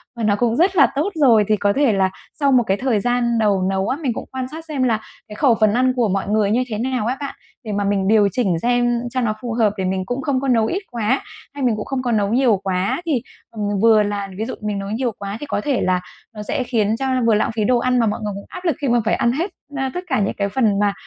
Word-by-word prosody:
và 235 - -4
nó 205 -1 +3
cũng 230 +1 +1
rất 370 +7 +2
là 285 -6 +6
tốt 305 +8 +1
rồi 245 -9 +5
thì 215 - +3
có 200 0 +1
thể 275 -5 +2
là 190 -1 +2 0.3
sau 280 -2 +3
một 250 -2 +5
cái 195 - +1
thời 245 -4 +1
gian 240 0 +1
đầu 205 -3 +2
nấu 195 0 -1
á, 265 - -1
mình 260 -6 0
cũng - - -6
quan 260 -1 -4
sát 320 +1 -8
xem 290 -5 -2
là 225 -3 +2 0.3
cái 210 - -9
khẩu 245 -1 +3
phần 215 -2 +3
ăn 255 +1 +2
của 240 -3 +2
mọi 195 +1 -1
người 210 -1 +1
như 245 +4 +2
thế 215 -3 -4
nào 250 0 -1
á 255 - -1
bạn, 280 -1 -5 0.3
để 215 - -5
mà 205 0 -1
mình 195 -1 0
điều 210 -1 +5
chỉnh 190 -6 0
xem 240 0 +2
cho 255 - 0
nó 215 -2 0
phù 240 -2 -4
hợp, 220 -3 +2
để 190 - -1
mình 185 0 -1
cũng 245 +6 -3
không 280 -4 0
có 275 - -2
nấu 230 -3 +3
ít 370 - -2
quá, 235 +2 0 0.3
hay 285 -1 -5
mình 240 -3 +2
cũng 210 - -5
không 270 -1 -2
có 245 - 0
nấu 210 0 +1
nhiều 245 -5 +3
quá. 190 - -1
Thì, 285 -8 0 0.3
ừm, 215 -2 -5 0.2
vừa 220 -1 +5
là 205 -1 -3
ví 220 - -2
dụ 260 - -5
mình 210 -1 -2
nấu 195 0 -5
nhiều 235 +3 -1
quá 200 +1 -5
thì 295 - -6
có 205 - -2
thể 275 -2 0
là 185 -1 +1 0.3
nó 210 - -6
sẽ 250 - -2
khiến 220 -3 0
cho 270 - -1 0.2
vừa 225 - +4
lãng 215 - +1
phí 220 - 0
đồ 245 +4 +3
ăn, 250 +1 +1
mà 230 - +3
mọi 210 - -1
người 205 -1 -3
cũng 200 - -8
áp 365 0 -9
lực 330 -6 +2
khi 280 - 0
mà 240 0 +3
phải 220 - +2
ăn 235 - +1
hết, 330 +10 -2 0.3
a, 265 -1 -1
tất 360 - -4
cả 260 -6 +1
những 200 - 0
cái 200 -1 0
phần 215 -4 +1
mà 205 -1 +2
230 Hz, 295 wpm, -20 LUFS, 205-255 Hz, 0.3 s, là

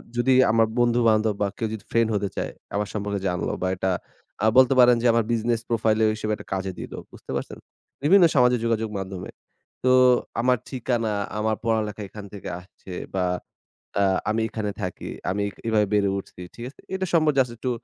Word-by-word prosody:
যদি 120 +2 +2 0.2
আমার 115 0 +4
বন্ধু 120 0 +3
বান্ধব 110 0 +2
বা 100 - +3
কেউ 115 - -1
যদি 110 - -7
ফ্রেন্ড 115 -1 +3
হতে 100 -1 -1
চায়, - - -3 0.2
আমার 105 0 0
সম্পর্কে 100 -1 -2
জানলো 90 -1 -1
বা - - +1
এটা 95 +1 0 0.5
আ - - +4
বলতে 130 0 +7
পারেন 125 -1 +7
যে 125 - -2
আমার 115 0 +3
বিজনেস 115 0 0
প্রোফাইলেও 110 -1 +2
হিসেবে 110 0 -3
একটা - - -13
কাজে 95 0 -2
দিল। - - -7 0.2
বুঝতে - - -11
পারছেন? - - -4 0.5
বিভিন্ন 180 +4 +6
সামাজিক 125 -2 +4
যোগাযোগ 115 -1 0
মাধ্যমে। 95 -1 -6 0.5
তো 130 - +3 0.5
আমার 125 +1 +3
ঠিকানা, 120 -3 -1 0.3
আমার 110 0 +1
পড়ালেখা 110 -2 -1
এখান 105 0 -9
থেকে 100 - -7
আসছে 95 +1 -15 0.2
বা 95 - +1 0.8
অ্যা 100 - +3 0.3
আমি 110 +1 0
এখানে 110 -2 -3
থাকি। 90 -2 -5 0.2
আমি 100 +2 -1
এক 100 - -10
এভাবে 110 -2 +3
বেড়ে 100 -1 +3
উঠছি। 95 - -10
ঠিক 120 - -8
আছে? - - -20
এটা 190 0 -1
সম্পর্কে 155 -4 +3
জাস্ট 125 -2 +1
একটু 125 +2 -2
110 Hz, 190 wpm, -24 LUFS, 105-120 Hz, 0.8 s, বলতে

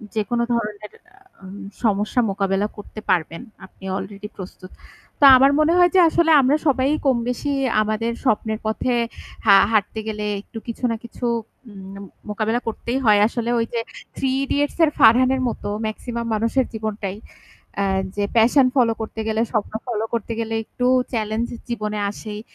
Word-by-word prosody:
যেকোনো 235 +3 0
ধরনের 210 -3 -4
আ - - -37 0.4
আ - - -10 0.4
সমস্যা 210 +2 +1
মোকাবেলা 195 +1 0
করতে 205 +1 -9
পারবেন। 165 -2 0 0.2
আপনি 190 - -21
অলরেডি 200 +1 -7
প্রস্তুত। 185 0 -10 0.5
তো 285 - +6
আমার 275 +2 +5
মনে 310 +2 +3
হয় 355 0 +6
যে - - +7
আসলে 325 0 +2
আমরা 270 +3 +3
সবাই 270 -1 +2 0.2
কম 260 -3 +3
বেশি 285 +3 -2 0.3
আমাদের 215 +2 -1
স্বপ্নের 220 -2 0
পথে 220 +3 -1 0.5
হা 200 -2 +7 0.2
হাঁটতে 215 0 0
গেলে 210 -1 -3 0.2
একটু 225 - -12
কিছু 235 +2 -7
না - - -1
কিছু 235 +1 -7 0.5
উম 195 -1 -11
ন - - -9 0.3
মোকাবেলা 220 +3 -1
করতেই 235 +3 -3
হয়। 210 -2 +5
আসলে 235 0 -3
ওই 230 - +1
যে 235 - 0 0.4
থ্রি 270 - -1 0.2
ইডিয়েটস 285 +1 -1
এর 310 - +4
ফারহানের 255 +4 +5
মতো - - -6 0.2
ম্যাক্সিমাম 235 +2 -4
মানুষের 230 +4 +1
জীবনটাই। 215 -3 -4 0.7
আ - - +1 0.3
যে 205 - 0
প্যাশন 250 +4 +5
ফলো 240 -3 +4
করতে 220 0 -5
গেলে, 220 0 0
স্বপ্ন 215 -3 -1
ফলো 225 -2 -2
করতে 230 0 -3
গেলে 225 0 -3
একটু 245 +3 -3 0.3
চ্যালেঞ্জ 220 0 -1 0.2
জীবনে 215 -3 -3
আসেই। 210 0 -8
225 Hz, 160 wpm, -21 LUFS, 210-245 Hz, 0.7 s, যে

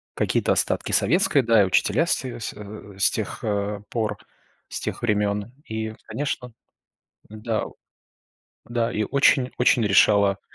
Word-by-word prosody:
какие-то - - +1
остатки - - 0
советской, 155 - +3
да, 115 -2 +5
и - - +4
учителя 130 - +2
все 125 -7 -2
с, 110 - -4
э, 105 -1 -10
с 100 - +3
тех, 110 +1 -5
а, 105 -1 -2
пор, 110 -3 -2 0.5
с - - -5
тех - - -4
времён. 105 -1 0
И, 110 0 -4
конечно, 130 -3 -4 0.8
н-да, 110 +1 -3 1.0
да, 120 -1 -1
и 105 - -1
очень-очень 125 -1 +3
решало 100 0 +4
110 Hz, 130 wpm, -24 LUFS, 105-120 Hz, 1.0 s, да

